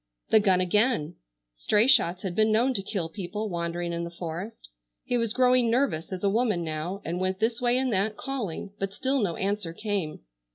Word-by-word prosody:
The 220 - +7
gun 190 -3 +3
again! 210 - +1 0.4
Stray 210 - +2
shots 195 - +4
had 190 -3 -3
been 215 +3 +3
known 240 +5 +3
to 200 - 0
kill 190 -4 -2
people 210 +4 -5
wandering 170 0 -3
in 170 0 -2
the 170 - -4
forest. 170 +5 -7 0.4
He 245 - -1
was 230 -2 0
growing 250 -1 +4
nervous 225 - 0
as 185 0 -5
a - - +3
woman 215 -4 +1
now, 165 +5 -4
and 170 +2 -2
went 185 0 -1
this 230 +2 0
way 245 0 +3
and 260 -2 0
that 205 +3 0
calling, 210 -8 -4
but 195 0 -3
still 265 +6 0
no 180 -5 0
answer 195 -3 -2
came. 200 -5 -3
200 Hz, 200 wpm, -27 LUFS, 175-230 Hz, 0.4 s, The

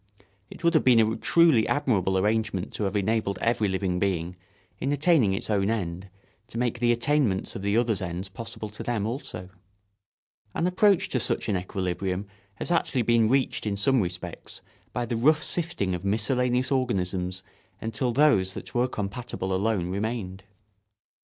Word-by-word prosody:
It - - -12
would 170 +1 +3
have 155 - +4
been 125 -3 +6
a 110 0 +3
truly 160 -9 +4
admirable 95 -10 +1
arrangement 105 -1 0
to 105 - -2
have 100 +1 -2
enabled 105 0 0
every 115 -2 +1
living 95 -2 -1
being, 90 -3 -1 0.4
in 135 - -1
attaining 145 - +3
its - - -4
own 100 -2 +1
end, 95 -4 -3 0.4
to 115 - -8
make 120 0 -1
the 120 0 +3
attainments 120 -4 +1
of - - -5
the 100 +2 +1
others' 115 -5 +1
ends 90 +1 -4
possible 110 +2 -7
to 105 - -8
them 115 -4 -1
also. 110 -6 -5 1.1
An 165 - 0
approach 190 +1 +3
to 130 - 0
such - - -1
an 100 - +1
equilibrium 95 +1 -2 0.3
has 135 - -5
actually 135 -7 +1
been 115 -1 +3
reached 130 -2 +1
in 100 - 0
some 130 +5 +3
respects 90 -1 -6 0.3
by 120 +1 -2
the 120 - -2
rough 150 +7 +3
sifting 160 - 0
of 90 +1 -4
miscellaneous 125 +5 +1
organisms 95 -7 -1 0.4
until 115 +3 -2
those 115 -9 +3
that - - -8
were 125 +1 +2
compatible 105 -3 -4
alone 95 -2 0
remained. 100 -2 -3
110 Hz, 165 wpm, -26 LUFS, 95-125 Hz, 1.1 s, been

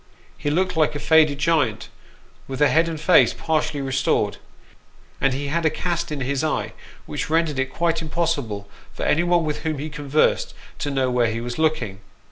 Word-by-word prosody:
He 145 - -3
looked 180 +4 0
like 155 -2 +2
a - - -3
faded 155 -2 +4
giant, 145 -8 +1 0.6
with 135 - -5
the 145 +1 +4
head 165 +2 +3
and 160 -2 -5
face 165 +3 +5
partially 155 -2 -1
restored; 130 -1 0 0.8
and 135 - +3
he 140 +2 -3
had 170 +3 0
a 160 - +4
cast 170 0 -2
in 145 -2 -3
his 135 +3 -1
eye 155 - -1 0.3
which - - -4
rendered 160 -3 +1
it 130 0 -1
quite 165 +1 0
impossible 140 -11 -2 0.2
for - - -6
anyone 175 +1 +2
with 150 -1 -2
whom 155 -1 -2
he 150 +3 -4
conversed 150 0 +1 0.2
to 145 - -2
know 135 -2 0
where 125 -1 +2
he 115 +1 -3
was 120 +4 -5
looking. 140 -12 0
150 Hz, 185 wpm, -22 LUFS, 135-160 Hz, 0.8 s, face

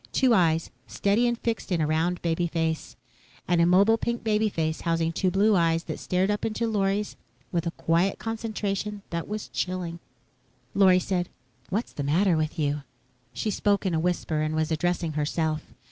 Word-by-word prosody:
Two 255 -3 +3
eyes, 165 -5 +2 0.2
steady 210 +5 +2
and 240 0 0
fixed 230 -3 -3
in 175 - +2
a 155 - +2
round 160 +3 0
baby 170 +1 +1
face. 160 -1 -2 0.5
An 175 -1 +2
immobile, 195 +6 +5
pink 235 +1 -2
baby 215 0 +2
face 160 -4 -2
housing 165 -1 0
two 185 +3 +1
blue 200 +3 +3
eyes 165 -1 +2
that - - -5
stared 185 +2 +1
up 205 - -2
into 225 +1 -1
Lorry's 205 -1 0 0.4
with 170 -1 -1
a - - -1
quiet 170 +4 +1
concentration 210 -2 -3
that 170 -1 -3
was 210 0 -4
chilling. 180 -2 -3 0.7
Lorry 190 -2 +6
said, 180 -1 -1 0.4
"What's 210 +6 -2
the - - -4
matter 170 +6 +3
with 155 0 -1
you?" 145 -1 0 0.5
She 215 - -2
spoke 200 0 +1
in 185 - +1
a 160 - +2
whisper 165 -2 0
and 155 0 -1
was 155 0 0
addressing 170 +1 0
herself. 155 +1 -1
180 Hz, 175 wpm, -26 LUFS, 165-205 Hz, 0.7 s, Lorry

